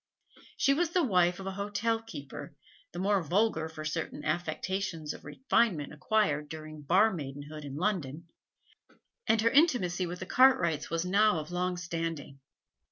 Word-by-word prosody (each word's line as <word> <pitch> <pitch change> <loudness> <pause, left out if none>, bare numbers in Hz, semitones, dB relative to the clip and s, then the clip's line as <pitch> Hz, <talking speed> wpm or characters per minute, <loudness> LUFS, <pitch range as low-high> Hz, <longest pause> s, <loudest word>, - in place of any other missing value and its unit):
She 275 - +4
was 335 +3 +1
the 350 0 +2
wife 180 - +2
of 190 - -7
an 195 - -3
hotel 205 +3 -1
keeper, 145 -6 -9 0.4
the - - -9
more 195 +1 +2
vulgar 170 -1 +1
for 155 -1 -8
certain 150 -1 -4
affectations 165 0 -2
of - - -12
refinement 165 - 0
acquired 150 -3 0
during 155 -1 -8
bar 190 +9 +4
maidenhood 145 -1 -7
in 140 -1 -7
London, 165 -3 -2 1.0
and 220 - +4
her 230 +1 +3
intimacy 195 - +3
with 175 +1 -5
the 185 - -6
Cartwrights 195 - +3
was 165 +2 -1
now 200 +1 +3
of 155 +1 -5
long 180 0 -1
standing. 165 -5 -4
175 Hz, 155 wpm, -30 LUFS, 155-210 Hz, 1.0 s, She